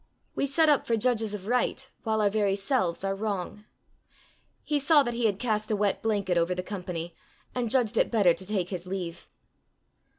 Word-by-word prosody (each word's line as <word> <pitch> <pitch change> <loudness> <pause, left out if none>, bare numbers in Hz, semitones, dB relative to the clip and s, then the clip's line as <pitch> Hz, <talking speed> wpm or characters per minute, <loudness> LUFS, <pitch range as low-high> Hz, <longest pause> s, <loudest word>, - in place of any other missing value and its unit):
We 280 - -1
set 315 +4 +3
up 295 -2 +3
for 230 - +2
judges 225 -2 +1
of 195 -2 -8
right 250 +3 0
while 220 -1 0
our 205 - +3
very 205 -2 +1
selves 195 -4 -1
are 195 0 0
wrong! 205 0 -4 1.0
He 295 -1 0
saw 290 +1 +5
that 240 -2 -3
he 235 -1 +1
had 200 -3 -1
cast 215 -2 -1
a 215 - +1
wet 205 -1 0
blanket 200 -5 +1
over 170 +2 0
the 180 - -3
company, 180 -4 -5 0.4
and 245 -2 -1
judged 240 -3 +2
it - - +3
better 200 -7 +4
to 190 - -8
take 195 -3 -1
his 180 -1 -5
leave. 180 -3 -5
210 Hz, 195 wpm, -27 LUFS, 190-240 Hz, 1.0 s, saw